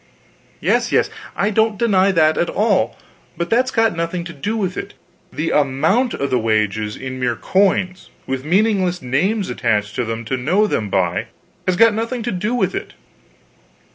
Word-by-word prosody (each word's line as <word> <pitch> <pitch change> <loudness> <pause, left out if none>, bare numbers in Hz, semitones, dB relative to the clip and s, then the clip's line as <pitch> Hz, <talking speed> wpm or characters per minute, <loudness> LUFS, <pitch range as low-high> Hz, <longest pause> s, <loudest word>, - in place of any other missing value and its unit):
"Yes - - +1
yes, - - +2 0.2
I 205 +2 +1
don't 220 0 +2
deny 195 -3 +3
that 155 -3 +3
at 170 - 0
all. 210 -2 +1 0.4
But 170 +1 -3
that's 250 +3 +3
got 225 -5 +2
nothing 170 +1 -2
to 170 0 -8
do 205 +10 -3
with 185 -4 -2
it; - - -6 0.4
the 160 +2 -2
amount 155 - +2
of 140 - -3
the 125 - +2
wages 110 -1 0
in 130 -1 -6
mere 120 -2 0
coins, 185 +1 0 0.2
with 130 0 -3
meaningless 185 0 +1
names 185 - 0
attached 105 -3 0
to 125 - +1
them 115 0 -4
to 130 +4 -2
know 180 +12 +2
them 110 - -1
by, 90 -2 0 0.4
has 185 - +2
got 230 +3 +5
nothing 230 +2 -3
to 240 - -2
do 210 +6 -1
with 245 - 0
it. - - -5
175 Hz, 175 wpm, -19 LUFS, 130-210 Hz, 0.4 s, got